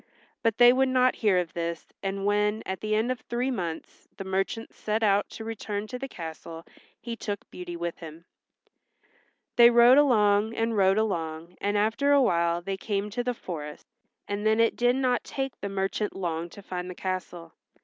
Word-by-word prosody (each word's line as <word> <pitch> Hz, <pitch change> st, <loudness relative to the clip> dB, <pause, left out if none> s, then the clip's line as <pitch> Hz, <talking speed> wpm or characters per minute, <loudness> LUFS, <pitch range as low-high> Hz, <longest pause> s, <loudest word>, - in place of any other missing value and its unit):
But 225 Hz, -1 st, +1 dB
they 245 Hz, 0 st, +8 dB
would 265 Hz, +1 st, +2 dB
not 255 Hz, 0 st, +3 dB
hear 205 Hz, -5 st, +3 dB
of 175 Hz, -3 st, -1 dB
this 170 Hz, -1 st, -3 dB, 0.2 s
and 195 Hz, 0 st, -3 dB
when, 210 Hz, +1 st, +1 dB
at 190 Hz, 0 st, -4 dB
the 215 Hz, 0 st, 0 dB
end 225 Hz, +4 st, +1 dB
of 255 Hz, -, -3 dB
three 245 Hz, +4 st, -2 dB
months, 170 Hz, -9 st, -5 dB
the -, -, -5 dB
merchant 195 Hz, +4 st, -2 dB
set 215 Hz, +1 st, -2 dB
out 200 Hz, -1 st, +3 dB
to 225 Hz, -, -8 dB
return 215 Hz, -2 st, -4 dB
to 250 Hz, +3 st, -7 dB
the 270 Hz, -, -4 dB
castle 165 Hz, -4 st, -8 dB, 0.3 s
he 235 Hz, -1 st, -5 dB
took 205 Hz, -3 st, -5 dB
Beauty 175 Hz, -1 st, -7 dB
with 170 Hz, 0 st, -4 dB
him. 165 Hz, 0 st, -10 dB, 1.3 s
They 235 Hz, 0 st, +9 dB
rode 240 Hz, +3 st, +7 dB
along 215 Hz, -5 st, +3 dB
and 225 Hz, 0 st, 0 dB
rode 195 Hz, 0 st, +4 dB
along 170 Hz, -5 st, -2 dB
and 205 Hz, +1 st, 0 dB
after 225 Hz, +7 st, +2 dB
awhile 170 Hz, -10 st, +2 dB
they 195 Hz, +1 st, -3 dB
came 205 Hz, 0 st, -2 dB
to 245 Hz, +3 st, -2 dB
the 250 Hz, 0 st, -2 dB
forest, 150 Hz, -7 st, -7 dB, 0.4 s
and 205 Hz, +1 st, -3 dB
then 220 Hz, +1 st, +3 dB
it 230 Hz, 0 st, +3 dB
did 245 Hz, +1 st, +2 dB
not 255 Hz, -2 st, +1 dB
take 270 Hz, -1 st, -5 dB
the 200 Hz, -, -3 dB
merchant 195 Hz, +2 st, -2 dB
long 170 Hz, -2 st, -3 dB
to 200 Hz, -, -13 dB
find 180 Hz, -1 st, -5 dB
the 180 Hz, -, -7 dB
castle. 180 Hz, -3 st, -5 dB
205 Hz, 190 wpm, -27 LUFS, 180-230 Hz, 1.3 s, They